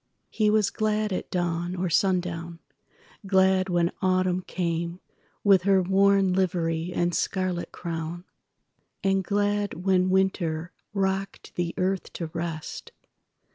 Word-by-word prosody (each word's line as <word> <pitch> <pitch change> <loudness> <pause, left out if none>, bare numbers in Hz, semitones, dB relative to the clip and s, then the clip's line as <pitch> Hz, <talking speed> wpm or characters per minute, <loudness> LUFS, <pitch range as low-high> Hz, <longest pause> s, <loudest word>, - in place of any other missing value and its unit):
He 215 -1 +2
was 210 -1 +3
gladAt 215 -2 -1
dawn 175 0 -1
or 185 0 -1
sundown; 170 -2 0 0.7
glad 190 0 +3
when 175 -1 +2
Autumn 185 -1 +2
cameWith 175 +2 -1
her 195 0 +4
worn 195 0 +4
livery 170 -2 0
and 175 0 0
scarlet 185 -2 -1
crown, 170 0 -5 0.8
And 195 0 +2
glad 205 +1 0
when 185 -1 +3
Winter 180 -3 0 0.2
rocked 195 -1 -2
the 175 -1 -2
earth 190 +1 -1
to 170 - -4
rest. 165 -2 -5
185 Hz, 110 wpm, -26 LUFS, 175-195 Hz, 0.8 s, her